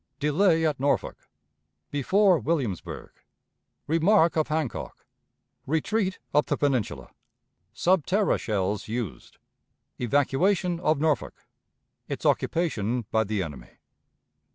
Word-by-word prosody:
Delay 160 +3 +3
at 150 -4 0
Norfolk. 140 +1 -1 0.6
Before 185 +6 +3
Williamsburg. 125 - -3 0.7
Remark 165 +2 +3
of 155 -1 +1
Hancock. 155 -4 -4 0.6
Retreat 185 +6 0 0.2
up 150 0 +3
the - - 0
Peninsula. 110 - -1 0.6
Sub 175 +7 +1
terra 200 +2 +2
Shells 100 -1 -2
used. 110 -5 -5 0.6
Evacuation 165 - +1
of 155 -3 +2
Norfolk. 155 -5 -1 0.6
Its - - -5
Occupation 120 - 0
by 110 0 +3
the 105 -2 -2
Enemy. 70 -7 -10
150 Hz, 100 wpm, -26 LUFS, 115-170 Hz, 0.7 s, Delay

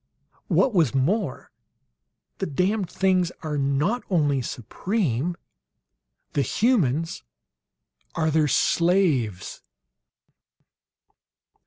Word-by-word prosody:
What 260 - +2
was 160 - +2
more 170 - -1 0.9
"The - - -2
damned 185 +6 0
things 185 -2 +1
are 155 -2 -3
not 145 - 0
only 145 -7 +2
supreme; 160 - -2 1.0
THE 145 - +1
HUMANS 165 - +1 0.9
ARE 160 -1 +1
THEIR 155 -1 +3
SLAVES!" 145 - +1
160 Hz, 75 wpm, -24 LUFS, 135-190 Hz, 1.0 s, THEIR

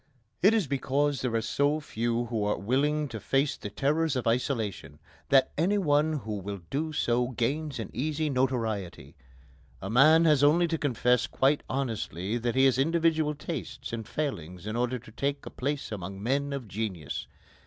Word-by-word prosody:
It 205 +5 +6
is 215 -5 +2
because 140 +1 0
there 125 -3 -1
are 115 - +2
so 145 +6 +1
few 120 -4 -1
who 115 -3 -2
are 105 - 0
willing 145 +8 +1
to 115 -2 -6
face 135 +7 +1
the 105 - -7
terrors 150 +5 0
of 125 - -2
isolation 115 - -1 0.3
that 135 -1 +5
any 195 +6 +2
one 155 -3 +2
who 110 -8 -4
will 100 0 -6
do 155 +3 -1
so 120 -4 +1
gains 135 +5 -2
an 110 -4 -5
easy 155 +3 -1
notoriety. 120 - -2 0.6
A 95 - -5
man 155 +7 +6
has 150 -3 +4
only 165 +4 +5
to 165 - 0
confess 125 -3 +2
quite 140 +2 +2
honestly 115 -5 -2
that 120 +1 -1
he 130 +1 +5
has 130 -1 +3
individual 160 0 +2
tastes 145 -5 -6
and 115 -2 -4
failings 90 - -4
in 110 +1 -3
order 125 +1 0
to 115 -2 -14
take 140 +4 -2
a - - -7
place 140 -1 -3
among 95 -1 -6
men 140 +4 0
of 135 -5 -4
genius. 95 -7 -4
130 Hz, 175 wpm, -28 LUFS, 115-150 Hz, 0.6 s, It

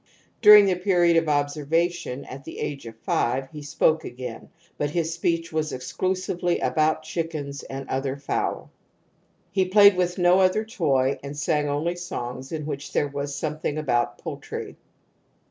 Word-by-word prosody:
During 210 -1 +10
the 190 - +2
period 175 -2 +3
of 165 -1 +2
observation, 150 +1 -1
at 135 +1 -9
the - - -9
age 140 -5 -4
of 115 -1 -10
five, 130 +3 0
he 150 -2 -8
spoke 155 +2 +1
again, 125 -2 -7 0.3
but 145 - 0
his 165 +1 -1
speech 165 0 -1
was 155 -1 -1
exclusively 180 +6 -1
about 155 0 +1
chickens 155 -4 -4
and 135 0 -7
other 135 +1 -2
fowl. 140 - -3 0.8
He 190 -1 +2
played 200 +1 +7
with 180 -1 0
no 180 +1 +4
other 190 +4 +3
toy 140 - +1
and 140 +1 -7
sang 150 0 0
only 155 +5 -1
songs 130 -6 -6
in 155 -2 -4
which 145 -2 -6
there 145 - +1
was 140 0 -4
some 155 +1 -3
thing 150 -1 -2
about 125 -6 0
poultry. - - -7
155 Hz, 160 wpm, -25 LUFS, 140-175 Hz, 0.8 s, During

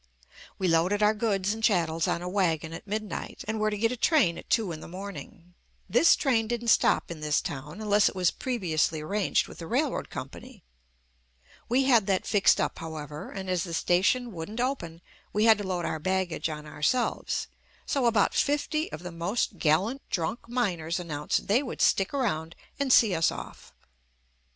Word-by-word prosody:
We 190 - 0
loaded 180 +5 +2
our 210 +1 +5
goods 205 -2 0
and 225 0 -7
chattels 165 -6 +2
on 170 - -1
a - - -4
wagon 165 -4 0
at 165 - -9
midnight 215 +1 -5
and 220 0 -2
were 215 0 +2
to 210 - -3
get 225 +3 +1
a - - -2
train 250 - +3
at - - -14
two 220 -6 +1
in 155 - -6
the - - -10
morning. 180 -2 -9 0.3
This 245 - +5
train 230 -6 +1
didn't 235 0 -2
stop - - +3
in 165 - -6
this 150 -1 +1
town 145 +7 -6
unless 210 -1 +3
it - - -12
was 180 -2 +2
previously 165 - -1
arranged 195 +5 0
with - - -12
the 165 - -7
railroad 270 - -1
company. - - -9 1.1
We 255 +3 +3
had 235 -6 +4
that 195 -2 +1
fixed 205 -2 +4
up, - - -1
however, 155 0 -7
and 190 -1 -6
as 180 -2 0
the 170 -3 -4
station 205 +9 +2
wouldn't 195 +6 -6
open, 175 -11 -2 0.3
we 210 +1 +2
had 220 -2 +6
to - - -3
load 180 -2 -2
our 160 - -2
baggage 185 -1 -1
on 150 -1 -6
ourselves, 150 - -1 0.4
so 270 -4 +1
about 220 -4 +3
fifty 300 +2 0
of 165 - -7
the 180 - -6
most 175 +3 -2
gallant 195 - +1
drunk 200 +8 -3
miners 180 -9 -1
announced 150 -4 -2
they 220 +6 +3
would 265 - -6
stick 195 0 +3
around 170 - -2 0.2
and 280 -2 +1
see 220 -5 +6
us 165 -1 +2
off. - - -9
195 Hz, 185 wpm, -27 LUFS, 165-225 Hz, 1.1 s, had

